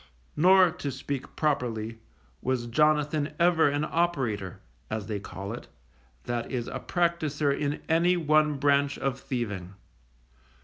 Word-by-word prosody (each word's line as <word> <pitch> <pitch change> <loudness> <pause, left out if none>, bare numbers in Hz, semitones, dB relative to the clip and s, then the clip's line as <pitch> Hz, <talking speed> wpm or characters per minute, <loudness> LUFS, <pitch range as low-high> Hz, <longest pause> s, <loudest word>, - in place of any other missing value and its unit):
Nor, 185 +2 +6
to 160 -4 -5
speak 135 0 -5
properly, 115 -7 -1 0.4
was 130 -2 -1
Jonathan 150 +3 +1
ever 170 -3 +4
an 145 +1 0
operator, 130 - -1 0.3
as 110 -2 -3
they 105 -2 -3
call 100 +1 -7
it, 120 - -8 0.6
that 120 -1 -3
is 120 -3 -2
a - - -4
practicer 155 -5 0
in 145 +1 -2
any 170 +3 +3
one 155 -2 +3
branch 140 0 +2
of 135 -1 -2
thieving. 105 -9 -4
140 Hz, 130 wpm, -28 LUFS, 120-155 Hz, 0.6 s, Nor